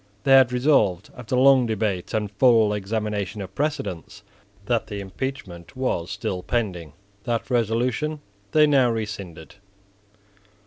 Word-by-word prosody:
They 135 Hz, -, +1 dB
had 130 Hz, -2 st, +7 dB
resolved, 125 Hz, -, +2 dB
after 125 Hz, 0 st, -4 dB
long 130 Hz, -1 st, +5 dB
debate 105 Hz, -4 st, -2 dB
and 105 Hz, -2 st, -2 dB
full 110 Hz, -1 st, +4 dB
examination 105 Hz, 0 st, -3 dB
of 95 Hz, -1 st, -7 dB
precedents, 135 Hz, -, -4 dB, 0.4 s
that 115 Hz, +1 st, 0 dB
the 105 Hz, -1 st, -6 dB
impeachment 95 Hz, -2 st, -7 dB
was 125 Hz, -10 st, -2 dB
still 95 Hz, -2 st, -4 dB
pending. 90 Hz, -, -3 dB, 0.3 s
That 120 Hz, +2 st, -2 dB
resolution 125 Hz, +6 st, 0 dB, 0.3 s
they 155 Hz, -1 st, +5 dB
now 135 Hz, -4 st, +4 dB
rescinded. 100 Hz, -8 st, -6 dB
110 Hz, 125 wpm, -23 LUFS, 100-130 Hz, 0.4 s, had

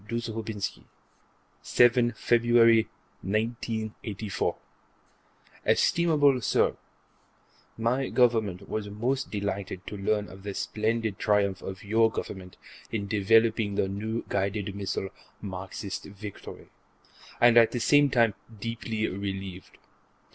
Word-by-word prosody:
Dzhoubinsky_: 110 Hz, -3 st, -4 dB, 0.8 s
7 120 Hz, 0 st, +4 dB
Feb., 115 Hz, -1 st, +4 dB, 0.3 s
1984 110 Hz, -1 st, -2 dB, 1.1 s
Estimable 145 Hz, -6 st, +3 dB
Sir: -, -, +2 dB, 1.0 s
My 125 Hz, +4 st, 0 dB
Government 110 Hz, -6 st, +2 dB
was 105 Hz, -1 st, -3 dB
most 125 Hz, +6 st, -2 dB
delighted 100 Hz, -2 st, -4 dB
to -, -, -6 dB
learn 105 Hz, +1 st, 0 dB
of 95 Hz, +1 st, -12 dB
the 100 Hz, 0 st, -6 dB
splendid 110 Hz, -1 st, -1 dB
triumph 100 Hz, -3 st, +1 dB
of 95 Hz, 0 st, -7 dB
your 110 Hz, +2 st, +3 dB
Government 95 Hz, -4 st, -7 dB, 0.3 s
in 100 Hz, -3 st, -2 dB
developing 110 Hz, 0 st, +3 dB
the 95 Hz, -, +1 dB
new 110 Hz, +4 st, -3 dB
guided 100 Hz, 0 st, -1 dB
missile 95 Hz, -1 st, -3 dB, 0.3 s
Marxist 95 Hz, 0 st, -6 dB
Victory, 100 Hz, 0 st, -10 dB, 0.7 s
and 120 Hz, -1 st, +6 dB
at 115 Hz, -1 st, +7 dB
the 120 Hz, -, -3 dB
same 145 Hz, +3 st, +5 dB
time 115 Hz, -4 st, +3 dB, 0.3 s
deeply 110 Hz, 0 st, -3 dB
relieved. 95 Hz, -1 st, -6 dB
110 Hz, 105 wpm, -27 LUFS, 100-115 Hz, 1.1 s, at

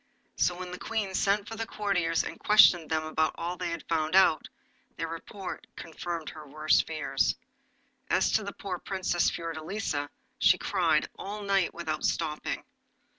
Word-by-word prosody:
So 175 Hz, -, +1 dB
when 180 Hz, 0 st, -6 dB
the 180 Hz, -, -7 dB
Queen 215 Hz, -4 st, -2 dB
sent 200 Hz, +2 st, +1 dB
for 225 Hz, -, -6 dB
the 225 Hz, 0 st, -4 dB
courtiers 180 Hz, -7 st, 0 dB
and -, -, -7 dB
questioned 180 Hz, -6 st, +6 dB
them 160 Hz, -1 st, +1 dB
about 155 Hz, 0 st, 0 dB
all 175 Hz, +2 st, -3 dB
they 175 Hz, -, -3 dB
had 170 Hz, -1 st, -5 dB
found 160 Hz, 0 st, 0 dB
out, 190 Hz, -4 st, +5 dB, 0.5 s
their 165 Hz, -, -2 dB
report 180 Hz, +4 st, -7 dB
confirmed 165 Hz, -1 st, -5 dB
her 155 Hz, -1 st, -10 dB
worst 155 Hz, +2 st, +2 dB
fears. 160 Hz, -1 st, 0 dB, 0.7 s
As -, -, +3 dB
to 215 Hz, -, +2 dB
the 200 Hz, -, -4 dB
poor 185 Hz, -3 st, -5 dB
Princess 185 Hz, -3 st, 0 dB
Fiordelisa, 165 Hz, -2 st, -3 dB, 0.3 s
she -, -, +6 dB
cried -, -, +1 dB
all 205 Hz, +1 st, -5 dB
night 195 Hz, -3 st, +1 dB
without 160 Hz, -3 st, -3 dB
stopping. 155 Hz, -2 st, -1 dB
175 Hz, 160 wpm, -29 LUFS, 160-195 Hz, 0.7 s, questioned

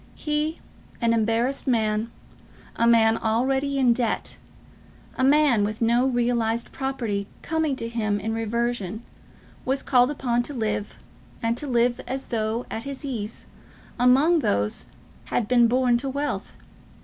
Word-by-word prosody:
He, 300 Hz, +1 st, -2 dB, 0.4 s
an 230 Hz, -1 st, +2 dB
embarrassed 230 Hz, +5 st, 0 dB
man, 220 Hz, -2 st, +1 dB, 0.7 s
a 230 Hz, -, +2 dB
man 225 Hz, -1 st, +4 dB
already 265 Hz, +5 st, 0 dB
in 250 Hz, -3 st, +4 dB
debt, 235 Hz, -2 st, -2 dB, 0.8 s
a -, -, -1 dB
man 275 Hz, -5 st, +4 dB
with 215 Hz, +1 st, -2 dB
no 235 Hz, +3 st, +3 dB
realised 235 Hz, -2 st, 0 dB
property 235 Hz, -7 st, -3 dB, 0.2 s
coming 320 Hz, -3 st, 0 dB
to 230 Hz, -, -4 dB
him 215 Hz, -3 st, -1 dB
in 220 Hz, +2 st, -3 dB
reversion, 225 Hz, -2 st, -2 dB, 0.6 s
was 270 Hz, +1 st, -1 dB
called 250 Hz, -1 st, +4 dB
upon 245 Hz, -5 st, 0 dB
to 280 Hz, +4 st, -7 dB
live, 215 Hz, -3 st, -2 dB, 0.5 s
and 230 Hz, 0 st, +1 dB
to 290 Hz, -, -6 dB
live 240 Hz, -1 st, +1 dB
as 265 Hz, +1 st, -4 dB
though 220 Hz, +1 st, -1 dB
at 225 Hz, -, -3 dB
his 275 Hz, +2 st, -7 dB
ease, 225 Hz, -6 st, -5 dB, 0.5 s
among 275 Hz, +8 st, +5 dB
those 105 Hz, -, 0 dB
who -, -, -25 dB, 0.4 s
had 225 Hz, -, +1 dB
been 240 Hz, -1 st, +5 dB
born 245 Hz, 0 st, +3 dB
to 270 Hz, +3 st, -3 dB
wealth. 285 Hz, +2 st, -3 dB
240 Hz, 145 wpm, -24 LUFS, 225-265 Hz, 0.8 s, among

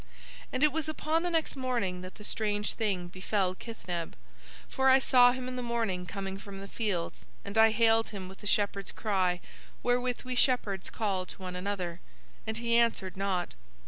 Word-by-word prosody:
"And 255 Hz, -, 0 dB
it 300 Hz, -, +6 dB
was 315 Hz, -1 st, -2 dB
upon 310 Hz, +1 st, 0 dB
the 355 Hz, -, 0 dB
next 325 Hz, -3 st, 0 dB
morning 240 Hz, -9 st, -1 dB
that 185 Hz, 0 st, -9 dB
the 210 Hz, -, -12 dB
strange 210 Hz, -1 st, -1 dB
thing 195 Hz, -6 st, -1 dB
befell 185 Hz, +1 st, 0 dB
Kithneb; 180 Hz, -6 st, -5 dB, 0.5 s
for 265 Hz, 0 st, +2 dB
I 260 Hz, -, +8 dB
saw 250 Hz, -2 st, +6 dB
him 255 Hz, 0 st, -4 dB
in 255 Hz, 0 st, -4 dB
the -, -, -2 dB
morning 225 Hz, -7 st, -1 dB
coming 195 Hz, 0 st, -4 dB
from 200 Hz, -1 st, -9 dB
the 195 Hz, -, -7 dB
fields, 200 Hz, -6 st, -2 dB, 0.2 s
and 200 Hz, +1 st, -6 dB
I 220 Hz, 0 st, +7 dB
hailed 225 Hz, 0 st, +3 dB
him 195 Hz, -3 st, -6 dB
with 190 Hz, +1 st, -11 dB
the 205 Hz, -, -6 dB
shepherd's 200 Hz, -1 st, +1 dB
cry 185 Hz, -4 st, 0 dB, 0.4 s
wherewith 245 Hz, 0 st, +1 dB
we 255 Hz, -, -3 dB
shepherds 245 Hz, -7 st, +2 dB
call 195 Hz, -4 st, -1 dB
to -, -, -7 dB
one 180 Hz, -1 st, -5 dB
another, 180 Hz, -2 st, -3 dB, 0.5 s
and 220 Hz, 0 st, -1 dB
he 235 Hz, 0 st, +3 dB
answered 220 Hz, -5 st, +1 dB
not. 190 Hz, -2 st, -1 dB
210 Hz, 185 wpm, -30 LUFS, 190-245 Hz, 0.5 s, I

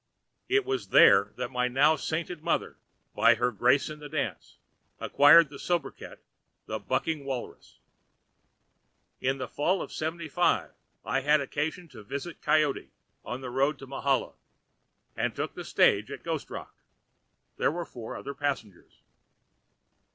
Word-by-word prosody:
It 400 Hz, 0 st, +2 dB
was 400 Hz, -1 st, -2 dB
there 100 Hz, -1 st, +6 dB
that 125 Hz, -1 st, -4 dB
my 125 Hz, 0 st, 0 dB
now 135 Hz, +5 st, +4 dB
sainted 160 Hz, +3 st, -4 dB
mother, 170 Hz, +1 st, -2 dB, 0.3 s
by -, -, +5 dB
her 125 Hz, -, 0 dB
grace 125 Hz, +6 st, +2 dB
in 155 Hz, 0 st, -8 dB
the 150 Hz, -1 st, -9 dB
dance, 140 Hz, -, -4 dB, 0.4 s
acquired 150 Hz, +2 st, +6 dB
the 140 Hz, -1 st, -11 dB
sobriquet 170 Hz, -6 st, -3 dB
of -, -, -17 dB, 0.5 s
'The -, -, -4 dB
Bucking 160 Hz, -3 st, -2 dB
Walrus.' 130 Hz, -3 st, -7 dB, 1.4 s
"In 135 Hz, +1 st, 0 dB
the 130 Hz, -2 st, -4 dB
fall 180 Hz, +9 st, 0 dB
of -, -, -6 dB
'75 165 Hz, +1 st, -1 dB, 0.3 s
I 135 Hz, -, 0 dB
had 150 Hz, +2 st, +4 dB
occasion 150 Hz, +5 st, -3 dB
to 125 Hz, -6 st, -12 dB
visit 140 Hz, +10 st, -7 dB
Coyote, 150 Hz, -3 st, +1 dB, 0.3 s
on 120 Hz, +4 st, -6 dB
the 125 Hz, -2 st, -6 dB
road 135 Hz, +4 st, +1 dB
to 135 Hz, -, -10 dB
Mahala, 135 Hz, -1 st, -1 dB, 0.8 s
and -, -, -1 dB
took -, -, -3 dB
the -, -, -7 dB
stage -, -, +3 dB
at -, -, -8 dB
Ghost -, -, -3 dB
Rock. -, -, -8 dB, 0.8 s
There -, -, +2 dB
were 170 Hz, +2 st, -4 dB
four 115 Hz, -6 st, -8 dB
other 140 Hz, -, -6 dB
passengers. 135 Hz, -10 st, -5 dB
140 Hz, 145 wpm, -28 LUFS, 130-160 Hz, 1.4 s, there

